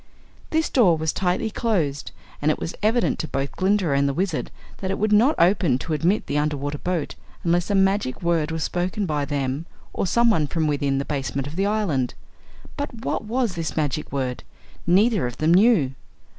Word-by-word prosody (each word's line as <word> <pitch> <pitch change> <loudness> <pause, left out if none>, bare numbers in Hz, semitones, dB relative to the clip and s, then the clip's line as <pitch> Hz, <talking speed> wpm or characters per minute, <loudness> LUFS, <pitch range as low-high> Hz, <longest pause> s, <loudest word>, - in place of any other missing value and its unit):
This 320 0 +1
door 190 -11 +4
was 160 0 -1
tightly 190 +4 0
closed 170 - -1 0.3
and 150 - +2
it 155 - +1
was 165 - -4
evident 225 +3 +1
to 160 - -2
both 135 -1 -2
Glinda 190 -3 +1
and 140 0 +2
the 140 - -2
Wizard 180 -2 -1 0.3
that 190 - -4
it 195 - -1
would 215 +1 0
not 240 +9 +5
open 175 -6 +3
to 155 +4 -4
admit 170 +8 +1
the 145 - 0
underwater 145 -1 -2
boat 175 -5 -2 0.3
unless 175 +2 +1
a 205 - +1
magic 195 -7 +1
word 165 -3 +1
was 160 0 -2
spoken 185 +4 -1
by 150 -4 -1
them 140 +2 -2 0.3
or - - -1
someone 225 -7 +3
from 160 +2 -1
within 140 -2 0
the 140 - -2
basement 135 -2 -3
of 145 +2 -7
the 195 +2 +1
island. 175 - 0 0.6
But 285 -6 -5
what - - -2
was 235 -2 0
this 165 -3 -4
magic 150 -1 -1
word? 130 -3 -3 0.4
Neither 195 - +3
of 120 - -7
them 155 +2 +3
knew. 185 - +4
170 Hz, 190 wpm, -23 LUFS, 145-205 Hz, 0.6 s, not